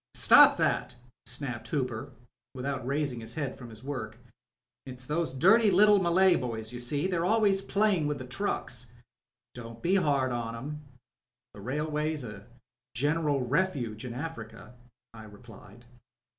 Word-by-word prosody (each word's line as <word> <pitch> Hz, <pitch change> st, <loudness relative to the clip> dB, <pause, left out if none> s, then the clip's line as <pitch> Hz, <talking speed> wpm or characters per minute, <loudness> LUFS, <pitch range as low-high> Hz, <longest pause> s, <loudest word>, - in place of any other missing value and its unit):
"Stop -, -, +7 dB
thatl" -, -, 0 dB, 0.3 s
snapped 125 Hz, -4 st, -5 dB
Hooper, 125 Hz, -2 st, -3 dB, 0.4 s
without 130 Hz, -1 st, -4 dB
raising 140 Hz, -3 st, -1 dB
his 110 Hz, -, -8 dB
head 145 Hz, -5 st, -3 dB
from 125 Hz, -2 st, -11 dB
his 110 Hz, +1 st, -11 dB
work. 120 Hz, -6 st, -5 dB, 0.7 s
"It's 125 Hz, -1 st, -6 dB
those 155 Hz, +1 st, -1 dB
dirty 195 Hz, -, +5 dB
little 205 Hz, +2 st, +6 dB
Malay 180 Hz, +1 st, +4 dB
boys, 115 Hz, -2 st, -5 dB
you 120 Hz, -, -6 dB
see: 140 Hz, +6 st, -1 dB
they're 180 Hz, -3 st, 0 dB
always 200 Hz, 0 st, +3 dB
playing 195 Hz, -6 st, +1 dB
with 150 Hz, -1 st, -2 dB
the 130 Hz, -, -7 dB
trucks... 125 Hz, -, -4 dB, 0.3 s
." 125 Hz, 0 st, -64 dB
"Don't 115 Hz, -1 st, -10 dB
be 190 Hz, +3 st, +3 dB
hard 140 Hz, -7 st, +1 dB
on 115 Hz, -1 st, -3 dB
'em. 150 Hz, +6 st, -6 dB, 0.7 s
The -, -, -11 dB
railway's 150 Hz, +2 st, -2 dB
a 105 Hz, -2 st, -9 dB, 0.5 s
general 145 Hz, 0 st, 0 dB
refuge 130 Hz, -, -1 dB
in 120 Hz, -2 st, -6 dB
Africa," 125 Hz, -6 st, -7 dB, 0.4 s
I 110 Hz, -1 st, -11 dB
replied. 105 Hz, +1 st, -15 dB
130 Hz, 145 wpm, -29 LUFS, 120-160 Hz, 0.7 s, Stop